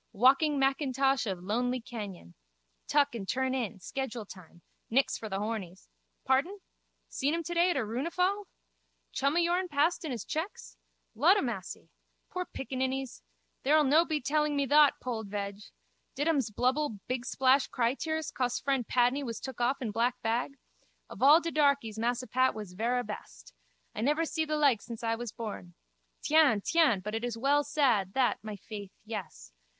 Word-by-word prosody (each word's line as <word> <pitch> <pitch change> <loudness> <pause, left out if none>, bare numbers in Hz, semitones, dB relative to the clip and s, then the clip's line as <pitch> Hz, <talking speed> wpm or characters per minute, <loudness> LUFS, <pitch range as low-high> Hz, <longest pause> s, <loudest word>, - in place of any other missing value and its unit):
Walking 275 +7 +4
Mackintosh 270 -1 +1
of 185 -3 -4
lonely 245 +6 0
canyon. 205 - -8 0.5
Tuck 285 -2 +3
and 200 -5 -6
turn 260 +1 0
in. 230 -6 -3
Schedule 245 +2 -4
time. 175 -3 -14 0.3
Nix 265 +4 +2
for 220 - -6
the 195 - -2
hornies. 200 -4 -5 0.4
Pardon? 275 +10 +1 0.5
Seen 285 +4 -1
him 335 - -3
today 345 +2 +2
at 350 - 0
a - - +1
runefal? 360 - -1 0.7
Chum 275 +3 0
o' - - +4
yourn 350 +2 +1
passed 325 +3 +1
in 315 - -4
his 240 -6 -4
checks? 325 +7 -5 0.4
Ludamassy! 245 - +1 0.4
Pore 365 0 -3
piccaninnies! 265 0 -3 0.4
Thou'll 300 +3 +4
no 300 +4 +5
be 310 -3 -1
telling 300 +3 0
me 280 -1 +1
thot, 295 +1 +5
Pold 225 -4 -4
veg! 200 0 -4 0.6
Did 290 +3 -1
ums 280 -8 +2
blubble 255 +2 0
bigsplash 260 +2 +2
crytears 280 +6 -1
cos 245 -1 -1
fren 270 -3 0
Padney 250 +4 +2
was 230 -4 -5
took 260 -2 -7
off 260 +3 +1
in 220 - -2
black 235 +3 0
bag? 240 +5 -1 0.5
Of - - -10
all 290 +5 +8
de 335 -1 -4
darkies 280 -8 +1
Massa 240 +2 0
Pat 255 +2 +2
was 210 -4 -7
verra 240 +5 0
best. 210 - -9 0.4
I - - -4
never 300 +7 +2
see 320 0 -1
the 305 0 -1
like 275 -8 +3
since 235 -1 -8
I 225 0 +1
was 230 -1 -4
born. 205 -7 -7 0.5
Tiens, 295 -10 +4
tiens, 310 - +3
but 210 +2 -4
it 225 +1 -2
is 240 -2 -3
well 285 +4 +3
sad, 245 -11 +1
that, 260 -2 +2
my 215 -1 -5
faith, 200 -1 -9
yes. - - -7
255 Hz, 165 wpm, -30 LUFS, 225-290 Hz, 0.7 s, all